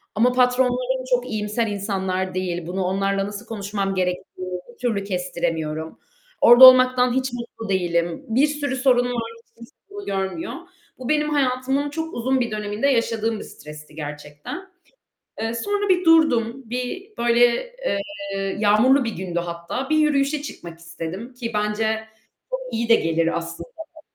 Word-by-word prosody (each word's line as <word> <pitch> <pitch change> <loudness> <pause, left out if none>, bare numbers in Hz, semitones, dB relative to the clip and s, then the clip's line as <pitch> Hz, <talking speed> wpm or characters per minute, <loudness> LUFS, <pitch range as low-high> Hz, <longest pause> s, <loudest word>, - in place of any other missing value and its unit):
ama 235 +4 +4
patronlarım 250 +1 +2
çok 250 +1 -4
iyimser 215 +2 -1
insanlar 190 -2 -2
değil. 175 -2 -3
Bunu 185 +2 -2
onlarla 195 +1 0
nasıl 205 +2 -7
konuşmam 200 -3 -3
gerektiğini 180 0 -3
bir - - -25
türlü 225 -5 -1
kestiremiyorum. 170 -4 -3 0.4
Orada 240 +2 +10
olmaktan 255 -1 +7
hiç 260 -1 -1
mutlu 235 -2 -7
değilim, 170 -3 0
bir 260 +7 +4
sürü 290 -3 -2
sorun 250 -1 +3
var, 235 -2 -3
hiç - - -41
kimse 235 +3 -14 0.2
bunu 405 0 -8
görmüyor. 195 - -3 0.5
Bu, 255 0 -6
benim 300 0 +2
hayatımın 270 0 0
çok 320 +2 -5
uzun 260 +3 0
bir 240 -2 -1
döneminde 210 +4 -1
yaşadığım 230 -4 +1
bir - - -6
stresti 150 0 -12
gerçekten. 145 - -7 0.8
Eee, 225 +1 -1
sonra 410 - -1
bir 365 -1 +3
durdum, 270 -7 +4
bir 250 - -4
böyle, 240 - +2
eee, 200 - -3
yağmurlu 220 +6 +4
bir 230 - -3
gündü 175 -1 -3
hatta, 170 +10 -4
bir 310 - +3
yürüyüşe 295 -1 +2
çıkmak 170 - -9
istedim, 170 +8 -7
ki 240 -2 -5
bence 215 +1 0 0.5
çok - - -2
iyi 230 0 -1
de 230 - +8
gelir 165 -1 +1
aslında 170 - -7 0.3
bu. 315 - -14
230 Hz, 150 wpm, -22 LUFS, 190-260 Hz, 0.8 s, Orada